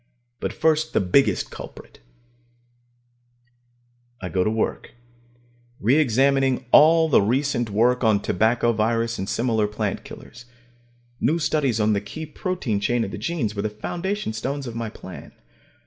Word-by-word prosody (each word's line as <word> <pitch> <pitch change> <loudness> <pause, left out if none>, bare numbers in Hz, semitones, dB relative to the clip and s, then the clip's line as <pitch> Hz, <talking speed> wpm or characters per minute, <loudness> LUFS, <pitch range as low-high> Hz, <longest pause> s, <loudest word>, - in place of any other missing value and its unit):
But - - -3
first 160 0 +1
the - - +3
biggest 105 +2 +2
culprit. - - -11 2.2
I 90 - -5
go 90 0 +1
to 105 - +1
work, 110 0 -2 0.9
re 115 +6 +2
examining 135 -1 +2
all 160 +2 +6
the 150 - +4
recent 120 +2 0
work 120 +5 +2
on 110 -3 +4
tobacco 115 +5 +1
virus 115 +1 0
and 95 - -4
similar 115 -3 +1
plant 105 -1 -3
killers. 120 +1 -12 0.7
New 155 +7 +1
studies 150 -7 0
on 105 0 +2
the 100 - 0
key 155 +10 -7
protein 155 - -3
chains 120 +3 0
of 95 - -7
the - - -6
genes 145 -12 -2
were 100 - -3
the 110 - -1
foundation 175 - -4
stones 135 +5 -4
of 120 - -6
my 115 -1 -4
plan. 95 -3 -11
115 Hz, 150 wpm, -23 LUFS, 105-140 Hz, 2.2 s, all